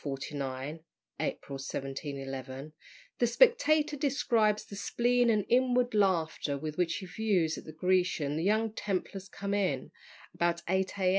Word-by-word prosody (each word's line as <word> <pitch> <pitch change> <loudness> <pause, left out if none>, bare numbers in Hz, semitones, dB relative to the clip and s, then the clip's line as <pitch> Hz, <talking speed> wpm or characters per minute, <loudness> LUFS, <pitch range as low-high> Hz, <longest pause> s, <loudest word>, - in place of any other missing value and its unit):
49 140 +1 -4 0.4
(April 140 - -3
1711), 135 0 -5 0.5
the 240 - +4
Spectator 310 - +4
describes 235 -7 +1
the 200 - -9
spleen 240 +4 +2
and 210 -3 +2
inward 250 -1 +3
laughter 170 -8 +1
with 155 +1 -5
which 175 -1 +1
he 190 - -5
views 185 -5 +1
at - - -9
the 155 - -8
Grecian 175 -3 +1
the 160 - -1
young 215 +3 +2
Templars 195 -1 -3
come 200 0 -4
in, 200 -2 0 0.4
about 170 0 0
8 190 +2 0
A. 185 -2 +2
185 Hz, 140 wpm, -30 LUFS, 150-220 Hz, 0.5 s, the